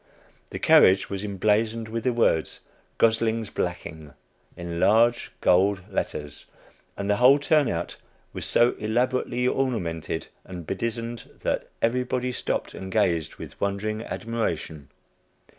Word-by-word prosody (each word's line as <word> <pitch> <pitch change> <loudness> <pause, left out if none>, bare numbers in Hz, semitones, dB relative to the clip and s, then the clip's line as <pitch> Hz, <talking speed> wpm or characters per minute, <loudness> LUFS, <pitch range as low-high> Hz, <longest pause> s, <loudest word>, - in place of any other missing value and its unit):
The - - -6
carriage 95 +2 +5
was 100 0 -3
emblazoned 110 +3 0
with 115 +2 -4
the 125 - +3
words 115 -9 +1 0.4
"Gosling's 115 -1 +1
Blacking," 80 -4 -5 0.4
in 85 -1 -5
large 120 +5 +3
gold 95 +2 +3
letters, 75 -5 -4 0.5
and 100 - -3
the 105 0 +2
whole 130 +3 +7
turnout 145 - 0 0.4
was - - -4
so 120 +1 +4
elaborately 125 +2 0
ornamented 90 - -2 0.2
and 90 -3 -9
bedizened 115 +5 -4
that - - -2
everybody 125 +1 0
stopped - - -3
and 95 0 -7
gazed 85 -7 +1
with - - -11
wondering 105 +2 -1
admiration. 85 - -4
110 Hz, 120 wpm, -25 LUFS, 90-120 Hz, 0.5 s, whole